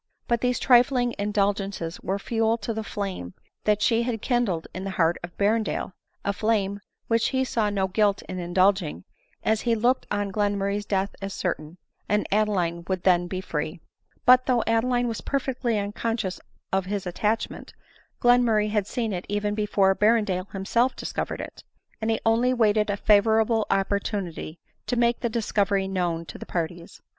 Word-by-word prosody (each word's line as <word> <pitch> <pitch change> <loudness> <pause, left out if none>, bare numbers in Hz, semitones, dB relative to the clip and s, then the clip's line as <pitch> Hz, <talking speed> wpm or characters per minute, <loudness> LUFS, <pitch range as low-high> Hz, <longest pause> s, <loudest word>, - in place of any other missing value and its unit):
But 235 -1 +1
these 250 0 +1
trifling 245 -1 +4
indulgences 200 -4 -1
were 195 +2 -1
fuel 225 +2 0
to 230 +1 -4
the 220 0 -3
flame 190 - -5 0.3
that 210 0 +2
she 230 0 +3
had 235 -2 -2
kindled 220 -9 0
in 185 - -5
the 195 - -3
heart 165 0 +3
of 175 0 -9
Berrendale; 210 -2 0 0.3
a 200 - +1
flame 205 -2 0 0.3
which 230 0 +2
he 260 -1 +1
saw 225 -4 0
no 195 -2 0
guilt 200 +1 +1
in 185 -1 -6
indulging, 175 - +1 0.4
as 220 0 +1
he 235 -1 +2
looked 245 +4 +1
on 205 -1 -1
Glenmurray's 205 0 -1
death 195 0 -1
as 195 0 -4
certain, 165 -2 -3 0.3
and 210 0 +2
Adeline 190 -5 +1
would 185 -2 -2
then 175 -2 +3
be 185 +1 -4
free. 155 0 -4 0.5
But 255 0 +6
though 245 -3 +3
Adeline 245 +2 +1
was 225 -2 -3
perfectly 255 -4 -1
unconscious 205 -1 -2 0.3
of 190 -1 +1
his 200 -1 -3
attachment, 210 +5 -2 0.5
Glenmurray 235 -4 +4
had 210 -2 0
seen 225 -3 -2
it 180 0 -5
even 205 0 -1
before 205 -2 +2
Ber 220 +4 +4
rendale 190 -3 -3
himself 230 +6 +1
discovered - - -4
it; - - -9 0.4
and 220 - -1
he 225 - +1
only 235 +3 +3
waited 215 -2 +3
a 205 - 0
favorable 220 +2 +3
opportunity 195 -4 -2 0.3
to 245 - 0
make 235 0 +2
the 240 - -1
discovery 205 -4 0
known 175 -3 -1
to - - -9
the - - -9
parties. 170 0 -4
205 Hz, 170 wpm, -25 LUFS, 190-230 Hz, 0.5 s, But